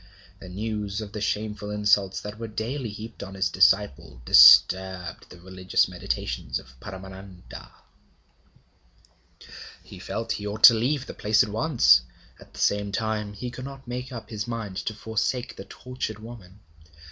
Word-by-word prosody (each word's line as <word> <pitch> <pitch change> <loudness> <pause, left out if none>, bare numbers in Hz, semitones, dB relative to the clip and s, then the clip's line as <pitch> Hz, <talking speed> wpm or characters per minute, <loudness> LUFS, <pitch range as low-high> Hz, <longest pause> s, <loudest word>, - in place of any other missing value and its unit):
The 95 - -11
news 105 +1 -4
of 105 -2 -7
the 105 - -6
shameful 105 0 -3
insults 105 -2 +1
that 105 +1 -8
were 115 - -5
daily 115 +4 -4
heaped 110 +2 -9
on 95 0 -8
his 95 -3 0
disciple 90 -8 +2
disturbed 95 +4 +5
the 90 - -14
religious 95 +1 0
meditations - - -4
of 65 - -13
Paramananda. 95 +1 -11 2.1
He - - -13
felt 115 - -5
he 105 - -3
ought 105 +2 -6
to 115 - +11
leave 125 +5 -1
the - - -8
place 105 +1 +2
at - - -5
once; 115 - +4 0.4
at - - -17
the - - -13
same 100 0 0
time 105 0 -3
he 125 +4 -6
could 130 +1 -8
not 135 -1 -10
make 125 +2 -6
up 115 -3 -9
his 105 0 -4
mind 110 -5 -5
to 110 - -2
forsake 110 +3 -3
the 95 - -10
tortured 125 -4 -6
woman. 105 -3 -13
105 Hz, 160 wpm, -25 LUFS, 95-115 Hz, 2.1 s, to